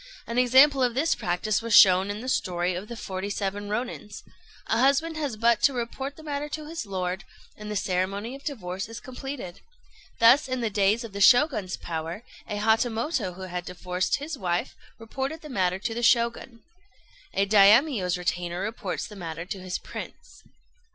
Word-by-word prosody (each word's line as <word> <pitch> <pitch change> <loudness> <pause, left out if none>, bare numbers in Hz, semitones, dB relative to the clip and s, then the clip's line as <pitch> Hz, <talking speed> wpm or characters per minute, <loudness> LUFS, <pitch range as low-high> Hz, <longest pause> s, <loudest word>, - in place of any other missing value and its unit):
An 235 +1 -1
example 265 +3 +6
of 245 -2 +1
this 315 +5 +2
practice 190 +5 -1
was 230 -1 +1
shown 185 +1 +7
in 205 +1 -4
the 255 - -7
story 180 -7 0
of 185 +4 -6
"The 235 - -7
Forty 190 -1 -5
seven 205 0 -3
Rônins." 215 -1 -5 0.4
A 225 - 0
husband 280 +5 +2
has 285 -8 -3
but 235 0 +3
to 280 - +4
report 260 +3 -4
the 315 - -13
matter 295 -1 -4
to 305 0 -5
his 315 -8 -5
lord, 185 -1 -3 0.3
and 210 0 -9
the 210 - -3
ceremony 195 +4 -1
of 275 +1 -10
divorce 195 - -5
is 230 - -7
completed. 255 -7 -7 0.6
Thus, 245 +5 +6
in 255 -1 -2
the 225 -2 -1
days 205 +4 +2
of 225 -4 -9
the 200 - -4
Shoguns' 245 - +4
power, 165 +5 -5 0.3
a 210 - -3
Hatamoto 225 - 0
who 190 - -8
had 180 -1 -5
divorced 180 +1 -2
his 290 0 -6
wife 175 -2 -2 0.2
reported 265 +7 -5
the 305 - -10
matter 185 -7 0
to 225 +4 -3
the 235 - -3
Shogun. 235 0 +1 0.7
A 195 - +3
Daimio's 205 - +5
retainer 175 0 -2
reports 215 -1 -4
the 215 -3 -11
matter 165 -3 -6
to 195 +1 -6
his 185 0 -3
Prince. - - -10
215 Hz, 180 wpm, -26 LUFS, 185-255 Hz, 0.7 s, shown